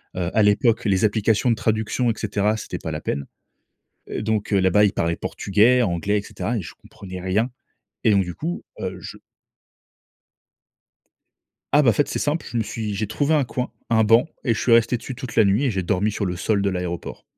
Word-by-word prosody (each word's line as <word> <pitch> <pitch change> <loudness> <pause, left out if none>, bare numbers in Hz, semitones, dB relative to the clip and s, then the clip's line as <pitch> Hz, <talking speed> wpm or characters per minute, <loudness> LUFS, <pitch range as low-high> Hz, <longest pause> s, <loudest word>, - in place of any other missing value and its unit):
Heu, 90 -1 -1
à 110 - +6
l'époque, 110 +3 +3
les 95 0 +2
applications 110 +3 +2
de 115 - +3
traduction, 110 +3 0
et - - -1
cetera, 105 +2 0
c'était 90 -4 -6
pas 80 - -5
la 75 - -4
peine. 70 -1 -3 0.8
Heu, - - -4
donc 105 -1 -1
heu, 100 - +4
là-bas, 105 +3 +4
ils 100 - +2
parlaient 85 0 0
portugais, 115 +6 +2
anglais, 100 +2 0
et - - -4
cetera 115 +3 -4
et 100 - -2
je 80 - -9
comprenais 95 -2 -10
rien 105 +7 0 0.5
et 110 - +5
donc 100 -1 +4
du 90 -1 -6
coup, 170 +3 -4 0.2
heu, - - -4
je - - -9 2.5
Ah 150 - +6
bah, 120 -5 +5
fait, 145 - +1
c'est - - -3
simple, 150 +3 -1
je 120 - -3
me 110 - +1
suis 105 -1 -4
j'ai 105 +1 -2
trouvé 145 +7 0
un 145 -3 +3
coin, 125 +1 -3 0.2
un 110 -1 +4
banc 115 +7 +4 0.2
et 120 - +2
je 110 - -3
suis 120 - +1
resté 115 +1 +4
dessus 125 +2 -7
toute 125 -2 -7
la 110 - +5
nuit 105 +8 +2
et 125 - +2
j'ai 95 -2 -2
dormi 100 +3 0
sur 105 - -2
le 90 -1 -2
sol 100 +3 0
de 100 - +1
l'aéroport. 90 -2 -5
105 Hz, 220 wpm, -22 LUFS, 95-115 Hz, 2.5 s, à